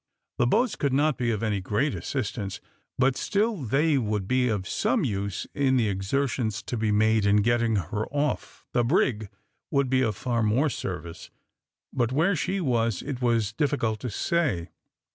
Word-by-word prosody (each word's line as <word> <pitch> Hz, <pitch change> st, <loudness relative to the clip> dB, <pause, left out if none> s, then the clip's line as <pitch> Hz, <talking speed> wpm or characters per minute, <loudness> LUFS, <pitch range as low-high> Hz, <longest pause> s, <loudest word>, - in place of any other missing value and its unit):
The 120 Hz, -, +4 dB
boats 235 Hz, -, +2 dB
could 140 Hz, -2 st, -1 dB
not 150 Hz, +1 st, +3 dB
be 120 Hz, -2 st, 0 dB
of 110 Hz, -1 st, -1 dB
any 105 Hz, -3 st, 0 dB
great 120 Hz, +10 st, 0 dB
assistance, 105 Hz, -7 st, -3 dB, 0.4 s
but 130 Hz, 0 st, +3 dB
still 210 Hz, -, 0 dB
they 145 Hz, +2 st, +2 dB
would 105 Hz, -4 st, -2 dB
be 130 Hz, +1 st, +2 dB
of 100 Hz, -4 st, -2 dB
some -, -, +1 dB
use 100 Hz, -2 st, -2 dB
in 135 Hz, -2 st, +2 dB
the 115 Hz, -4 st, +2 dB
exertions 110 Hz, +2 st, -1 dB
to -, -, -4 dB
be 110 Hz, -2 st, 0 dB
made 110 Hz, +1 st, +3 dB
in 100 Hz, 0 st, +4 dB
getting 115 Hz, 0 st, +2 dB
her 105 Hz, +3 st, -2 dB
off. 145 Hz, +1 st, -3 dB
The 120 Hz, -, +3 dB
brig 115 Hz, -, +1 dB, 0.4 s
would 140 Hz, -2 st, +1 dB
be 130 Hz, 0 st, +3 dB
of 110 Hz, -5 st, 0 dB
far 120 Hz, +2 st, -1 dB
more 120 Hz, +8 st, +2 dB
service; 85 Hz, -6 st, -6 dB, 0.6 s
but 120 Hz, -2 st, 0 dB
where 165 Hz, +8 st, +2 dB
she 180 Hz, +7 st, -1 dB
was, 115 Hz, -, 0 dB
it 135 Hz, -3 st, -5 dB
was 115 Hz, -4 st, +1 dB
difficult 115 Hz, -5 st, 0 dB
to 125 Hz, -, -4 dB
say. 115 Hz, -, 0 dB
120 Hz, 175 wpm, -26 LUFS, 105-135 Hz, 0.6 s, The